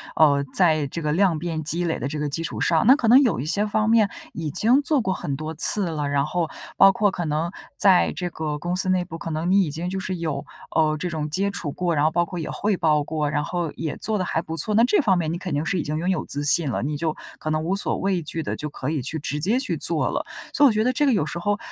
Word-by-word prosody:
呃， 140 -3 +4
在 155 -5 +3
这 170 - -5
个 150 -1 -1
量 175 -1 +2
变 160 -1 -3
积 165 +4 +1
累 165 -2 -1
的 130 - -3
这 150 +2 -4
个 150 0 -1
基 165 +4 -3
础 - - -4
上 165 +2 +2
那 265 - +8
可 250 -6 -1
能 250 +5 +8
有 245 -7 +1
一 130 - -3
些 200 +7 +1
方 215 +1 0
面 220 -3 +4 0.2
已 160 -3 -4
经 245 - +3
做 285 -2 +1
过 190 -4 -1
很 140 -6 -4
多 155 +3 -5
次 185 +4 +1
了， 150 -3 -2
然 140 0 +1
后 165 +2 -1 0.3
包 195 - +8
括 205 +2 +2
可 175 -2 -4
能 155 +3 -1 0.3
在 190 -3 +4
这 180 -1 -3
个 155 -3 -4
公 175 +3 -2
司 185 +1 -2
内 185 -1 +2
部， 165 -2 -8
可 165 - -6
能 160 +3 -2
你 200 +1 +5
已 155 - -3
经 165 +4 -4
就 190 +1 -3
是 185 -1 -3
有， 160 -4 -3 0.3
呃， 155 -1 +3
这 180 +4 -3
种 155 -3 -3
接 195 +6 0
触 175 -7 -4
过， 175 +2 -1
然 145 0 +2
后 155 - +3
包 175 +2 +2
括 175 +1 -7
也 160 - -4
汇 205 -2 -1
报 150 -3 +2
过， 150 0 -2
然 150 -1 0
后 170 0 -3
也 160 -2 -4
做 220 -1 0
得 185 - -1
还 160 - -1
不 160 - -5
错， 210 +5 -1
那 230 - +5
这 410 - +4
方 195 -9 +3
面 160 -2 -1
你 170 - -2
肯 180 -1 -5
定 145 +2 -1
是 180 +1 0
已 - - -1
经 150 +1 -3
拥 175 +3 -1
有 185 -4 -1
自 145 +1 -4
信 150 +1 +4
了， 115 - -2
你 145 +2 -2
就 155 0 -2 0.2
可 155 - -4
能 155 0 0
无 180 +4 0
所 - - -2
畏 190 -2 0
惧 160 +1 -5
地 - - -3
就 150 - -4
可 135 -1 -5
以 155 -3 -1
去 160 +6 -3
直 145 0 -3
接 200 +11 +1
去 270 - -2
做 - - -1
了。 - - -2 0.3
所 290 - +5
以 - - +9
我 - - +4
觉 215 0 +1
得 250 - +2
这 275 +4 +1
个 270 - +3
有 195 -9 +1
时 170 - -5
候 205 +3 0
165 Hz, 320 characters per minute, -23 LUFS, 155-190 Hz, 0.3 s, 以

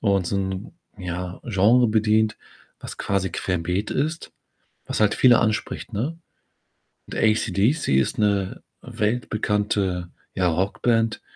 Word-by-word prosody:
und 100 -4 +1
so 100 - -1
'n, 95 +2 -3 0.3
ja, 90 0 -5
Genre 115 +3 +4
bedient, 110 0 +2 0.4
was - - -8
quasi 95 -2 -1
querbeet 90 +2 -2
ist, 155 +4 -2 0.5
was - - -3
halt 105 0 +4
viele 125 -2 +6
anspricht, 110 +1 -2
ne? 135 +11 -3 0.9
Und - - -8
ACDC 110 - +1
ist 65 - -1
'ne 100 -3 0 0.2
weltbekannte, 105 -5 -1 0.2
ja, 90 -1 +1
Rockband, 110 +6 +1
105 Hz, 115 wpm, -23 LUFS, 95-115 Hz, 0.9 s, viele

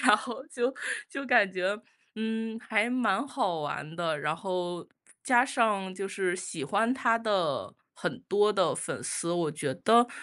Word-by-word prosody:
然 210 - +7
后 245 +3 -6
就 255 -1 0 0.4
就 275 0 -5
感 245 -6 +5
觉， 190 +3 0 0.4
嗯， 225 0 -3
还 220 0 +2
蛮 245 -1 +1
好 195 - -1
玩 150 +2 -4
的。 165 -3 -1
然 150 +2 0
后， 175 -1 -4 0.3
加 245 -1 +5
上 210 -8 +1
就 195 +1 -4
是 190 -2 -1
喜 185 0 -5
欢 225 +4 +2
他 240 -3 +3
的 205 -6 0 0.2
很 - - -3
多 205 +1 +4
的 190 -4 +2
粉 - - -4
丝， 170 - -1
我 170 -3 +1
觉 145 -2 -2
得 235 +2 +6
205 Hz, 175 characters per minute, -29 LUFS, 180-230 Hz, 0.4 s, 然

